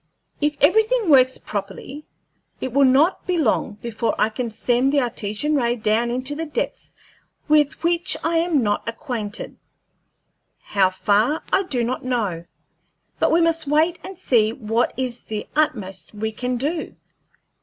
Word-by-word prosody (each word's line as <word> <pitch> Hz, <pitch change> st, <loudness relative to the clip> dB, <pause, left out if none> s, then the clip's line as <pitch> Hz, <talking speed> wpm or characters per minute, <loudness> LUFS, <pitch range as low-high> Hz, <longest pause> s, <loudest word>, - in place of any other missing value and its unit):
If 295 Hz, 0 st, 0 dB
everything 440 Hz, +6 st, +3 dB
works 260 Hz, -2 st, +5 dB
properly, 210 Hz, +9 st, -6 dB, 0.5 s
it 260 Hz, -, -4 dB
will 280 Hz, +1 st, +5 dB
not 285 Hz, +8 st, +3 dB
be 360 Hz, -1 st, +1 dB
long 260 Hz, -10 st, +1 dB
before 230 Hz, 0 st, -1 dB
I 215 Hz, -, +2 dB
can 235 Hz, +2 st, -4 dB
send 245 Hz, +4 st, +1 dB
the 290 Hz, -, +3 dB
Artesian 240 Hz, +3 st, -2 dB
ray 240 Hz, -3 st, +1 dB
down 225 Hz, +1 st, +1 dB
into 255 Hz, +4 st, -3 dB
depths 325 Hz, +10 st, -4 dB, 0.5 s
with 300 Hz, 0 st, +2 dB
which 340 Hz, +1 st, +1 dB
I 330 Hz, +1 st, +1 dB
am 330 Hz, -5 st, +2 dB
not 205 Hz, +1 st, -1 dB
acquainted 230 Hz, -3 st, -5 dB, 1.0 s
how 195 Hz, -2 st, +2 dB
far 210 Hz, -, +1 dB
I -, -, +5 dB
do 265 Hz, -11 st, -2 dB
not 250 Hz, +2 st, -2 dB
know 210 Hz, -10 st, -2 dB, 0.7 s
but -, -, +2 dB
we 335 Hz, -, +4 dB
must 330 Hz, -2 st, +1 dB
wait 315 Hz, +4 st, +2 dB
and 380 Hz, 0 st, -7 dB
see 230 Hz, -11 st, +2 dB
what 230 Hz, 0 st, 0 dB
is 250 Hz, -2 st, -2 dB
the 215 Hz, -1 st, -6 dB
utmost 215 Hz, -11 st, -1 dB
we 220 Hz, +1 st, -2 dB
can 250 Hz, +3 st, -3 dB
do. 305 Hz, +6 st, -3 dB
255 Hz, 150 wpm, -22 LUFS, 220-305 Hz, 1.0 s, works